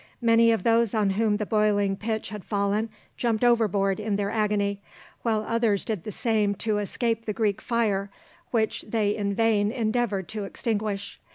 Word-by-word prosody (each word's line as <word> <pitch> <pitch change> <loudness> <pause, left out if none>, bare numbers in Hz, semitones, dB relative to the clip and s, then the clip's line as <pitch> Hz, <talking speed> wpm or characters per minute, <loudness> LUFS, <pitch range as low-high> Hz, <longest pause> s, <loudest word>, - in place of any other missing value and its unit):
Many 230 0 +5
of 225 -5 0
those 230 -1 +3
on 210 -3 +2
whom 210 +1 +1
the 210 - -2
boiling 205 -2 +2
pitch 220 +2 -3
had 210 -3 -7
fallen 205 +2 0 0.3
jumped 230 -1 0
overboard 210 -5 +2
in 210 -1 -1
their 200 0 -1
agony, 205 -2 0 0.4
while 220 -2 0
others 230 -4 +1
did 215 -7 -3
the 215 - -4
same 210 -1 +1
to 215 0 -1
escape 230 +2 -1
the 215 - -2
Greek 205 -2 0
fire, 210 -4 0 0.4
which 220 -2 0
they 210 -1 0
in 200 -1 -2
vain 215 -2 +2
endeavoured 220 -5 -1
to 210 -2 -4
extinguish. 205 -1 -3
215 Hz, 170 wpm, -26 LUFS, 200-225 Hz, 0.4 s, Many